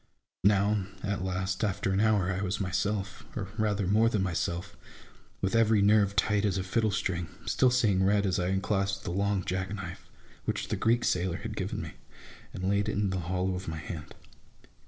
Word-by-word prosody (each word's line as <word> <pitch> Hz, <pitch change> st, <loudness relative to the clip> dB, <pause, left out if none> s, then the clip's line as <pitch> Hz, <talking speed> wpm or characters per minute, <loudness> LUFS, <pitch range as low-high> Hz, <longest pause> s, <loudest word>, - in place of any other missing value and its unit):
Now, 100 Hz, 0 st, +3 dB, 0.2 s
at 100 Hz, -1 st, -1 dB
last, 95 Hz, +2 st, -2 dB
after 100 Hz, -2 st, 0 dB
an 95 Hz, -, +1 dB
hour 105 Hz, -4 st, +3 dB
I 95 Hz, -, -2 dB
was 100 Hz, -1 st, -1 dB
myself, 100 Hz, +1 st, -2 dB
or 100 Hz, -6 st, -4 dB
rather 105 Hz, -3 st, 0 dB
more 110 Hz, +5 st, +4 dB
than 105 Hz, -4 st, 0 dB
myself, 85 Hz, -1 st, -2 dB, 0.7 s
with 95 Hz, -, 0 dB
every 110 Hz, -1 st, +4 dB
nerve 100 Hz, -1 st, +4 dB
tight 105 Hz, -1 st, +2 dB
as 100 Hz, -3 st, +1 dB
a 95 Hz, -, -1 dB
fiddle 110 Hz, +4 st, +1 dB
string, 90 Hz, -4 st, -1 dB, 0.2 s
still 130 Hz, -, +3 dB
seeing 110 Hz, -7 st, +3 dB
red, 100 Hz, +1 st, +3 dB
as 95 Hz, -2 st, +1 dB
I 90 Hz, -, 0 dB
unclasped 95 Hz, 0 st, 0 dB
the -, -, -3 dB
long 100 Hz, 0 st, 0 dB
jack 95 Hz, +1 st, -2 dB
knife, 90 Hz, -3 st, -8 dB, 0.4 s
which -, -, -2 dB
the -, -, 0 dB
Greek 120 Hz, +1 st, +2 dB
sailor 90 Hz, -1 st, +1 dB
had -, -, -6 dB
given -, -, -3 dB
me, -, -, -7 dB, 0.6 s
and 95 Hz, -, -4 dB
laid 100 Hz, +2 st, +1 dB
it -, -, -1 dB
in 100 Hz, -2 st, 0 dB
the 95 Hz, -, -1 dB
hollow 90 Hz, +2 st, -1 dB
of 90 Hz, +1 st, -5 dB
my 80 Hz, 0 st, -3 dB
hand. 80 Hz, 0 st, -7 dB
95 Hz, 195 wpm, -29 LUFS, 95-105 Hz, 0.7 s, more